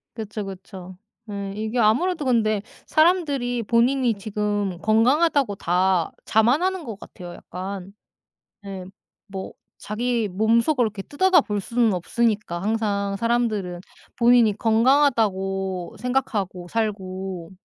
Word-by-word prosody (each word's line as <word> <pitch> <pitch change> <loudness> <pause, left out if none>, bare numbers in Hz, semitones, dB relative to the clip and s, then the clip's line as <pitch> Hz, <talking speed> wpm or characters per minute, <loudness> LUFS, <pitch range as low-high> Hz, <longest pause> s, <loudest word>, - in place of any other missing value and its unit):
그쵸, 215 -2 -5
그쵸. 185 -1 -9 0.3
예. 200 -1 -4
이게 220 +3 -3
아무래도 295 +9 +2
근데 215 -5 +2 0.2
사람들이 285 -8 +2
본인이 240 +2 +2
지금 205 -2 -2
건강하다고 255 +3 +3
다 180 -1 +1
자만하는 310 +11 +2
것 220 -5 -7
같아요 175 -5 -10
약간. 190 +1 -7 0.7
네. 195 -2 -7 0.4
뭐 195 -1 -6 0.3
자기 230 +1 -1
몸 220 +5 +3
속으로 255 -3 +2
이렇게 205 -2 -5
뜯어다 360 - +3
볼 210 -6 -3
수는 230 +1 +1
없으니까 205 -2 -1
항상 200 -2 -1
사람들은 215 -6 -1 0.4
본인이 235 -3 +4
건강하다고 220 -7 +1
생각하고 210 -8 -2
살고 190 -5 -3
215 Hz, 270 characters per minute, -23 LUFS, 195-245 Hz, 0.7 s, 본인이